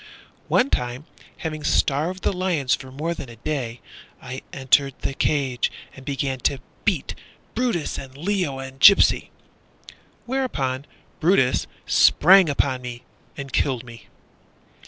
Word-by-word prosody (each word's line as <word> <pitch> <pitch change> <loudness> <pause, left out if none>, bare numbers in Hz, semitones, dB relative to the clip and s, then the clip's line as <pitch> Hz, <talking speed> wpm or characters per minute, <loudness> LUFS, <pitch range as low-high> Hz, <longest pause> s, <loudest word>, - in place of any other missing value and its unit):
One 255 +3 +2
time, 125 +3 -2 0.3
having 155 -2 -5
starved 160 +8 +1
the - - +1
lions 180 -8 0
For 130 - -4
more 155 +6 -2
than 135 - -8
a 115 - -11
day, 125 -2 -4 0.4
I 130 +1 -7
entered 135 0 +2
the 135 - -2
cage 135 -3 0 0.2
and 135 - -12
began 135 -1 -2
to 140 - 0 0.3
beat - - 0 0.4
Brutus 230 -10 -1
And 135 0 -10
Leo 175 -4 -1
and 135 0 -8
Gypsy. 200 +5 +6 1.0
Whereupon 145 - -2 0.3
Brutus 160 -7 +3 0.2
sprang 185 +1 +6
upon 135 -2 0
me, 120 -1 -7 0.3
And 140 -1 -7
killed 130 -4 0
me. 115 -2 -13
140 Hz, 130 wpm, -23 LUFS, 130-170 Hz, 1.0 s, Gypsy